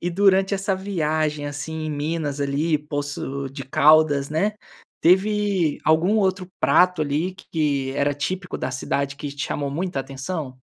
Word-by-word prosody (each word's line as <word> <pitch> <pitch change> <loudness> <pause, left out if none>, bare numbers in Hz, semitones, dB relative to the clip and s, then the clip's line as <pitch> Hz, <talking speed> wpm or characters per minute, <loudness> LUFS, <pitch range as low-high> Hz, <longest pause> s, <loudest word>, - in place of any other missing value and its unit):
E 175 - -2
durante 195 +1 +3
essa 195 0 0
viagem 155 -6 -1
assim, 155 +2 -5
em - - -3
Minas 150 -1 -2
ali, 145 +3 +1
Poços 145 -2 -4
de 135 -1 -7
Caldas, 150 0 +4
né, 195 +8 +1 0.5
teve 190 -2 +2
algum 165 +7 +3
outro 190 -2 0
prato 180 -2 +4
ali 155 +5 -1
que 145 -7 -1
era 145 +1 +2
típico 180 +6 -4
da - - -2
cidade 140 +2 -2
que 145 0 -5
te 140 0 -4
chamou 140 -1 -2
muita 175 +1 -2
atenção? 135 +1 -5
155 Hz, 150 wpm, -23 LUFS, 145-185 Hz, 0.5 s, Caldas